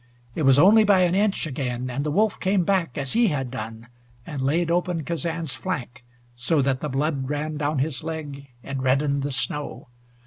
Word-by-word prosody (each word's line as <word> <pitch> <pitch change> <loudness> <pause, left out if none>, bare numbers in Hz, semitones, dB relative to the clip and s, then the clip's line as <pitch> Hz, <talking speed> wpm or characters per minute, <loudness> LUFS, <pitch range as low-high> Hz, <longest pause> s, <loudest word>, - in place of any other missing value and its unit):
It - - -3
was 135 -2 +5
only 205 +8 +7
by 200 -3 +4
an 175 -1 +3
inch 200 -1 +1
again, 125 -3 -3
and 140 +3 -2
the 150 - -1
wolf 210 +7 +1
came 190 -1 +2
back, 175 -7 0
as 140 -2 -1
he 235 0 +4
had 135 -7 -2
done, 115 -1 -7 0.4
and 150 -4 -5
laid 165 +5 +1
open 175 -2 0
Kazan's 165 -2 -3
flank 125 -10 -5 0.3
so 120 +6 0
that 135 -1 +1
the 150 - -3
blood 135 0 -1
ran 150 +1 -2
down 150 0 -1
his 140 +1 -1
leg 150 -4 -6 0.2
and 135 -1 -4
reddened 140 +2 +1
the 140 - -2
snow. 145 -1 -3
150 Hz, 195 wpm, -24 LUFS, 135-170 Hz, 0.4 s, only